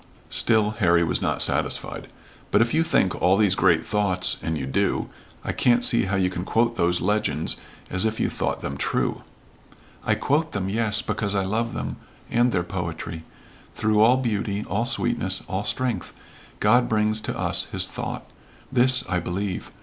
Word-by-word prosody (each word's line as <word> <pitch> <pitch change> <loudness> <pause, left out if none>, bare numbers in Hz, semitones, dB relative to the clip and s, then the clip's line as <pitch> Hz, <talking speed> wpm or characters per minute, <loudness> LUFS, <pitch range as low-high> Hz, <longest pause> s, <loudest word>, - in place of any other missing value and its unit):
Still 110 -2 +3
Harry 85 -4 +4
was 80 - 0
not - - +3
satisfied. - - +1 0.4
"But - - +3
if 115 +1 +2
you 160 - +3
think 95 - +2
all 95 +2 +4
these 105 -3 +3
great 85 -4 +2
thoughts 100 -4 +1
and 80 -1 -2
you 70 - -4
do 65 - -1 0.3
I - - -2
can't 120 0 +2
see 115 - +3
how 95 +1 -1
you 95 -1 +2
can 90 -1 -4
quote 115 +4 +1
those 90 -3 +1
legends 105 +3 +1 0.3
as 90 +2 +2
if 110 0 -1
you - - +1
thought - - -3
them - - -4
true." - - -1 0.8
"I - - +1
quote 155 +3 0
them, 95 -2 -2
yes, 110 +1 +1
because 105 -1 -2
I 95 -1 0
love 115 +4 -2
them, - - -4 0.3
and 120 +1 +3
their 90 -5 0
poetry. 85 -2 -5 0.5
Through 110 -1 +2
all 120 +4 +5
beauty 105 -4 -2
all 110 +4 -1
sweetness 120 -7 0
all 95 +2 -3
strength 120 +3 -2 0.5
God 120 +4 +3
brings 110 0 +1
to - - -4
us - - 0
his - - 0
thought. - - -6 0.5
This 130 0 +3
I 90 - 0
believe. 90 +2 -4
105 Hz, 175 wpm, -24 LUFS, 90-115 Hz, 0.8 s, all